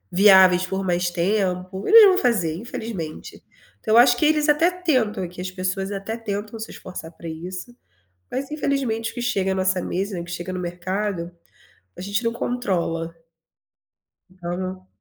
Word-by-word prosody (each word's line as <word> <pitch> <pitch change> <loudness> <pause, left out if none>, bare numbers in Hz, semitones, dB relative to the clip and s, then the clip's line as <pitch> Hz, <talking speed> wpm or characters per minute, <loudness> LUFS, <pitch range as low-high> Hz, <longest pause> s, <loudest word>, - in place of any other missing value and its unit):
viáveis 190 -2 +7
por 190 +1 -3
mais 175 0 +1
tempo, 185 +1 -1
eles 445 -1 +10
vão 375 -1 +5
fazer 210 - +1
infelizmente. 200 -6 -7 0.4
Então 215 - +1
eu - - +7
acho 245 0 +7
que 305 - +2
eles 300 0 +3
até 300 +4 +4
tentam, 255 - 0
que 180 +1 -9
as 185 0 -4
pessoas 185 +1 -3
até 200 +2 -4
tentam 210 0 -5
se 220 - -6
esforçar 175 -3 -9
para 170 - -11
isso, 180 +8 -7 0.6
mas 275 +2 -4
infelizmente 265 -7 -1
o - - -18
que 240 - -4
chega 195 -6 0
à - - -3
nossa 185 -1 +1
mesa, 190 0 -3
que 175 - -11
chega 175 +1 -5
no 185 - -3
mercado, 180 0 -3 0.7
a - - -9
gente 200 +5 -2
não 230 - +1
controla. 175 -9 -2 1.2
Então, 175 -1 -6
não 185 0 -6
190 Hz, 170 wpm, -23 LUFS, 180-230 Hz, 1.2 s, eles